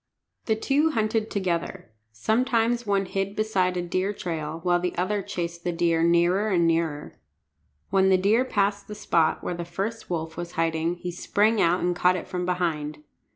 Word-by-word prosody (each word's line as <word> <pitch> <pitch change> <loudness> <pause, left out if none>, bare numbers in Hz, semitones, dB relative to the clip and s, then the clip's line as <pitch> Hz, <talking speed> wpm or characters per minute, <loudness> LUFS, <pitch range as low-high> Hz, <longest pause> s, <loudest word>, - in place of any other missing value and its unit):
The 220 - +2
two 285 +8 +2
hunted 220 -4 0
together. 170 - -3 0.2
Sometimes 230 - +1
one 200 -1 +1
hid 195 +1 -3
beside 190 -4 0
a 175 - -1
deer 185 +3 -1
trail, 160 -4 -4
while 175 -1 +3
the 180 0 -2
other 200 +3 0
chased 170 -2 -5
the 175 - 0
deer 170 -1 +1
nearer 170 +5 +3
and 175 -4 +2
nearer. 165 -3 -1 0.7
When 190 0 +4
the 190 - +5
deer 210 +6 +3
passed 200 -4 0
the 210 - -7
spot 170 -6 +1
where - - -2
the 170 0 -4
first 195 +7 -5
wolf 160 -2 -3
was 175 0 -6
hiding 165 +1 0
he 175 0 -5
sprang 205 +5 +1
out 170 +2 +3
and 175 0 0
caught 180 +1 +3
it 185 - -5
from 180 -1 -3
behind. 155 -4 -2
180 Hz, 180 wpm, -25 LUFS, 170-205 Hz, 0.7 s, the